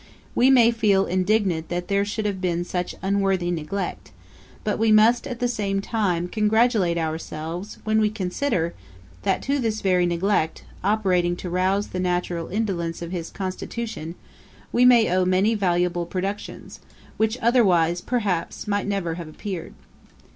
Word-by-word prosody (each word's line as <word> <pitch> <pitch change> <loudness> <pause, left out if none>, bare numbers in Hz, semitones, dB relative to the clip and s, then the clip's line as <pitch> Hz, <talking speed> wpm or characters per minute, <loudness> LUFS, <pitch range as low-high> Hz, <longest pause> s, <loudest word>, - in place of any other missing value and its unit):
We 255 - +4
may 240 -3 +6
feel 205 -4 +2
indignant 185 -3 0
that 175 0 -3
there 200 0 +2
should 215 +1 -3
have 195 -3 -2
been 175 -2 0
such 180 0 -3
unworthy 195 -2 +1
neglect; 175 +4 -4 0.5
but 210 - -1
we 225 0 +3
must, 225 +5 +5
at 250 -3 -5
the 245 - +1
same 200 -4 -1
time, 195 -5 -1
congratulate 215 -3 +2
ourselves, 160 +3 -4
when 220 0 +2
we 210 - +3
consider, 185 -2 -1 0.5
that - - 0
to 280 +1 0
this 220 -3 -1
very 180 -2 +2
neglect, 170 -1 0 0.2
operating 185 -4 +2
to 175 0 -6
rouse 190 +3 +1
the 185 - -4
natural 175 -2 -1
indolence 175 -5 -2
of 170 - -6
his 170 -3 -4
constitution, 190 -2 -5 0.6
we 250 +1 +5 0.2
owe 185 +1 +2
many 185 +4 +2
valuable 175 -3 0
productions, 195 +3 -5 0.4
which 220 +2 +1
otherwise, 180 -9 +3
perhaps, 205 -7 -2
might 205 -1 0
never 195 -5 -1
have 165 - -8
appeared. 175 +2 -6
195 Hz, 145 wpm, -24 LUFS, 175-215 Hz, 0.6 s, may